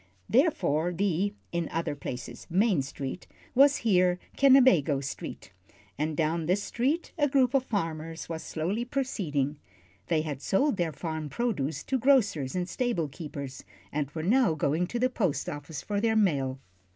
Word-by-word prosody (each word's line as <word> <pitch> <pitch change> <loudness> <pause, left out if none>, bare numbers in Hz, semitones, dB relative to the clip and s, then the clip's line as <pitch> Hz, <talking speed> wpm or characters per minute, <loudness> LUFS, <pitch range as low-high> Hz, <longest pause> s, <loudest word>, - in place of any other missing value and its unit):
Therefore 225 - +2
the 195 +2 0 0.2
in 170 -2 -2
other 165 -1 -2
places 125 -3 -7
Main 190 -2 +3
Street 135 +3 -6 0.3
was 280 +2 +6
here 180 -4 +4 0.2
Kennebago 250 - +5
Street, 135 0 -7 0.4
and 155 +1 -2
down 160 0 0
this 190 +3 +1
street 275 +11 -1
a 290 - +4
group 265 -2 +3
of 270 -2 +3
farmers 165 -6 -3
was 165 -1 -4
slowly 185 +9 -2
proceeding. 165 - -2 0.5
They 160 -2 +1
had 145 -4 -5
sold 245 - +1
their 170 -2 0
farm 160 0 -4
produce 160 - -2
to 265 - -1
grocers 220 - +3
and 180 -1 -1
stable 185 - -1
keepers, 140 -2 -7 0.3
and 145 -2 -2
were 155 +1 -5
now 220 -2 +3
going 155 +4 0
to 240 - -3
the 250 +2 +3
post 215 - -1
office 145 0 -6
for 205 -1 -1
their 225 0 +2
mail. 140 -11 +2
175 Hz, 155 wpm, -28 LUFS, 150-235 Hz, 0.5 s, was